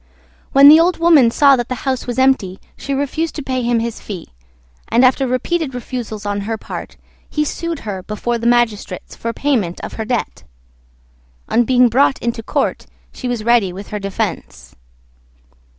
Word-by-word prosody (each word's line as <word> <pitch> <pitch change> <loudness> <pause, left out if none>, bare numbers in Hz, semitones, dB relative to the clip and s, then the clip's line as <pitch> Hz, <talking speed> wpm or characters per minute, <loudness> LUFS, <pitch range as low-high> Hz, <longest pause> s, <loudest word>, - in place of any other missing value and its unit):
When 275 +1 +7
the 310 +2 +9
Old 350 +1 +2
Woman 325 -8 +5
saw 275 +3 +5
that 240 -2 -3
the 255 -1 -5
house 260 -2 -1
was 245 0 -3
empty 260 -8 +2 0.2
she 280 - -7
refused 285 +4 -2
to 295 - -5
pay 260 -1 -2
him 240 -1 +1
his 230 0 -4
fee; 185 -6 -8 0.6
and, 245 +3 +4
after 265 +1 +2
repeated 265 +3 -1
refusals 235 -4 -6
on 205 0 -2
her 220 +2 -3
part, - - -8 0.3
he 300 0 -1
sued 335 +1 -4
her 200 -4 -5
before 220 +5 -3
the 235 - -1
magistrates 225 -6 0
for 230 - -4
payment 230 -10 -1
of - - -7
her - - -3
debt. 240 +1 -3 1.1
On 240 +1 +3
being 250 0 +4
brought 265 +3 +3
into 235 -1 -3
court - - -2 0.3
she 255 - -6
was 240 -3 -2
ready 230 -5 +3
with 195 +3 -9
her 210 - -4
defence. 200 0 -5
240 Hz, 175 wpm, -18 LUFS, 220-270 Hz, 1.1 s, the